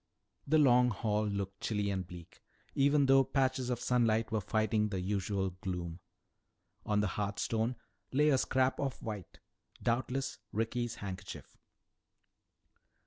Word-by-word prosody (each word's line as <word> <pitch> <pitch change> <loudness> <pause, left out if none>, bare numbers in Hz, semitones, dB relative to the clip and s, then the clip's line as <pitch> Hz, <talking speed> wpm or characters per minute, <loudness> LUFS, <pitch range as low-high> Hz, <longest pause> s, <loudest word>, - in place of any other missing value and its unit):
The 155 +3 +4
Long 125 -4 +6
Hall 105 -1 0
looked 100 -1 -3
chilly 105 -2 0
and 95 -2 -3
bleak, 85 -2 -12 0.3
even 140 +1 +4
though 135 0 +6
patches 130 -1 0
of 125 -1 -1
sunlight 115 -3 +2
were 110 -1 +1
fighting 110 +1 +1
the 95 -2 -2
usual 95 0 -1
gloom. 90 -2 -4 0.9
On 105 -1 +2
the - - +1
hearth 100 +1 -2
stone 115 +2 0 0.4
lay 150 +3 +4
a 135 -3 +4
scrap 130 0 +1
of 135 -2 -2
white, 105 -5 -6 0.4
doubtless 130 +3 -1
Ricky's 115 +2 -1
handkerchief. 95 -2 -7
110 Hz, 135 wpm, -33 LUFS, 100-130 Hz, 0.9 s, Long